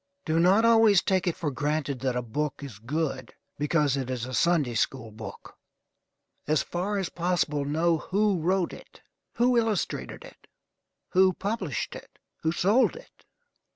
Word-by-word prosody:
Do 160 +1 +1
not 190 +6 +4
always 225 -4 +5
take 190 -2 +1
it 175 - +1
for 150 -3 -3
granted 145 -1 -2
that 130 -1 -1
a 125 - -1
book 145 +5 -3
is 120 -8 -9
good 135 +1 -3 0.2
because 150 -2 +2
it 130 -2 -3
is 125 -2 -3
a 130 - -7
Sunday 155 -5 +2
school 115 0 -1
book. 110 +1 -10 0.9
As 155 0 +2
far 195 +4 -2
as 190 -3 -2
possible 170 -5 -1
know 160 +3 +1
who 200 +1 +1
wrote 180 +1 +1
it, - - -14 0.3
who 245 +1 +3
illustrated 225 - -2
it, - - -16 0.6
who 185 0 +4
published 195 - -3
it, - - -12 0.2
who 160 - +1
sold 205 - +3
it. - - -15
165 Hz, 155 wpm, -27 LUFS, 140-190 Hz, 0.9 s, always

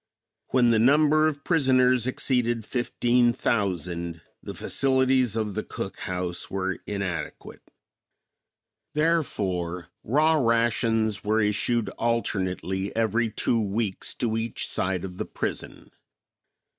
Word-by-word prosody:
When 125 -2 +3
the 110 - +3
number 150 +5 +4
of 145 -2 -3
prisoners 130 -6 +3
exceeded 120 -3 0
fifteen 120 0 +1
thousand, 85 -7 -2 0.2
the - - -7
facilities 130 -3 +2
of 110 -2 -1
the 110 - -2
cook - - -6
house 90 -1 -4
were 95 -2 -2
inadequate. 100 -4 -5 1.3
Therefore 95 - -1
raw 155 +7 +3
rations 115 -2 +1
were 110 +1 +1
issued 105 +2 +1
alternately 95 -4 -1
every 115 +1 +1
two 115 +2 0
weeks 105 -1 -2
to 115 -2 -1
each 115 0 -2
side 90 0 -1
of 90 -1 -9
the - - -2
prison. - - -5
115 Hz, 110 wpm, -26 LUFS, 95-125 Hz, 1.3 s, number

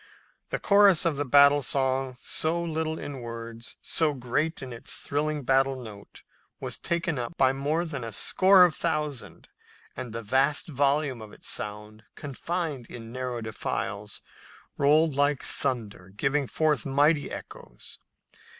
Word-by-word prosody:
The - - -1
chorus 200 -4 +5
of 160 -4 +1
the 145 - -1
battle 140 +2 +6
song, 130 -1 0
so 160 +2 0
little 160 -1 -2
in 140 -2 -6
words, 115 0 -8
so 155 -3 +2
great 135 +6 -2
in 130 -2 -7
its 115 - -1
thrilling 150 0 -2
battle 135 +1 +2
note, 105 -4 -11 0.4
was - - -2
taken 170 -4 -1
up 120 +8 -5
by 130 -1 +4
more 150 +5 -1
than 145 -6 -5
a 115 - -5
score 185 - +5
of 170 - 0
thousand, 150 -5 -3 0.5
and 125 -2 -6
the 115 +1 -5
vast 135 - +1
volume 140 -3 0
of 110 -1 -11
sound, 105 +1 -4
confined 150 -2 -4
in 115 -1 -9
narrow 125 -1 -4
defiles, 110 -1 -4 0.5
rolled 150 +2 +3
like 145 0 +1
thunder, 110 -9 -2
giving 135 +8 -1
forth 150 -3 +1
mighty 145 +2 +2
echoes. - - -9
140 Hz, 140 wpm, -27 LUFS, 120-155 Hz, 0.5 s, battle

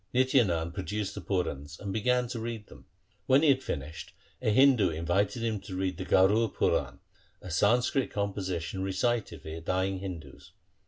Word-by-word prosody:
Nitya 130 0 +4
Nand 85 -2 -2
produced 100 +2 -3
the 100 - -6
Purans 80 -5 -3
and 100 -2 -4
began 125 +3 +1
to 120 - -4
read 115 -2 -5
them. - - -16 0.4
When 135 +3 +5
he 155 - +5
had 135 -1 +4
finished, 75 - -6 0.3
a - - +1
Hindu 125 -3 +5
invited 90 +8 0
him 110 -3 -1
to 95 - -8
read 95 -2 -1
the 95 - -5
Garur 105 +6 +4
Puran, - - 0 0.4
a 90 - -9
Sanskrit 120 - +2
composition 95 -3 -3
recited 95 - -1
for 80 +1 -6
dying 95 +3 -1
Hindus. 85 -8 -8
95 Hz, 165 wpm, -29 LUFS, 85-115 Hz, 0.4 s, When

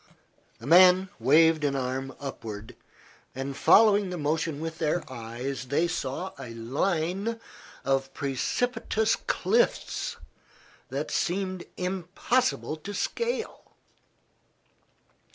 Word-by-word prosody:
The 115 - -12
man 180 +4 +7
waved 155 +5 +5
an 140 -1 +1
arm 135 0 -3
upward, 110 -6 -7 0.6
and 135 +1 -4
following 205 +4 +5
the 180 - -4
motion 155 0 -1
with 160 +1 -5
their 165 +1 0
eyes 120 +3 -5
they 145 +6 +1
saw 170 +2 -3
a 120 -4 -8
line 175 - -1 0.5
of 135 0 +1
precipitous 220 - 0
cliffs 485 +1 0 0.7
that - - -3
seemed 185 0 -1
impossible 185 +2 -1
to 200 +6 -7
scale. 470 - -3
160 Hz, 100 wpm, -27 LUFS, 135-190 Hz, 0.7 s, man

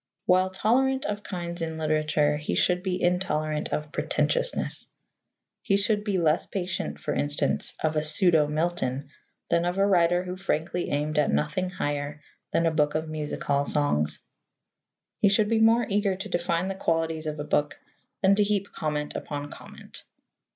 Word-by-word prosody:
While 185 +1 +4
tolerant 265 +8 +1
of 210 -4 -2
kinds 175 -3 -5
in 160 -1 -3
literature, 155 -1 +1
he 150 - -3
should 180 0 +2
be 185 -1 -2
intolerant 155 -4 0
of 150 -1 -3
pretentiousness. - - -1 0.7
He 195 - +2
should 205 +1 +1
be 205 -3 0
less 160 -1 +2
patient, 185 -2 -3
for - - -2
instance, 145 0 0
of 155 0 +1
a 155 - +2
pseudo 155 0 +4
Milton 150 -4 -1 0.4
than 170 - +2
of 175 +2 -1
a 195 - +4
writer 175 -2 +3
who 180 0 -5
frankly 180 -2 -2
aimed 150 +1 0
at 150 - +2
nothing 75 - 0
higher 145 -3 -3 0.3
than 170 - +1
a 165 - +3
book 150 -1 +1
of 155 0 -2
music 155 -1 -4
hall 140 0 +2
songs. 140 - +1 1.0
He 205 - +5
should 210 +1 +3
be 225 -1 +2
more 230 +2 +5
eager 200 -2 +1
to 195 +3 -6
define 175 +1 0
the 195 - -2
qualities 165 -3 -1
of 150 -1 -4
a - - -2
book 145 0 0 0.4
than 190 +1 +6
to 205 +1 +4
heap 205 -1 -1
comment 150 -1 -3
upon 145 0 -5
comment. - - -10
170 Hz, 170 wpm, -26 LUFS, 150-190 Hz, 1.0 s, than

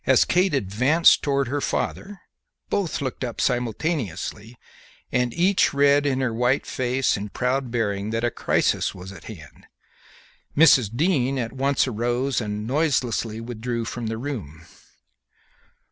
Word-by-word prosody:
As 130 -2 +5
Kate 180 -2 +2
advanced 130 - +3
towards 140 -3 0
her 145 0 -1
father 200 +6 -3 0.5
both 200 -8 -1
looked 130 -2 -4
up 120 -3 -5
simultaneously, 120 - -2 0.6
and 125 -1 +1
each 180 -1 +2
read 140 +1 +4
in 135 -1 0
her 125 -3 0
white 125 +4 +1
face 130 +1 0
and 100 0 -6
proud 130 +1 -1
bearing 105 -3 -1
that 115 +1 -2
a 120 - +1
crisis - - 0
was 90 +1 -9
at 95 -3 -12
hand. 85 -9 -12 0.9
Mrs. 145 -8 +6
Dean 140 -4 +1
at 115 -2 -3
once 135 +1 +1
arose 120 +3 -1
and 105 0 -4
noiselessly 125 -5 0
withdrew 115 0 -4
from 115 0 -5
the 110 0 -3
room. 100 - -6
125 Hz, 140 wpm, -23 LUFS, 115-140 Hz, 0.9 s, Mrs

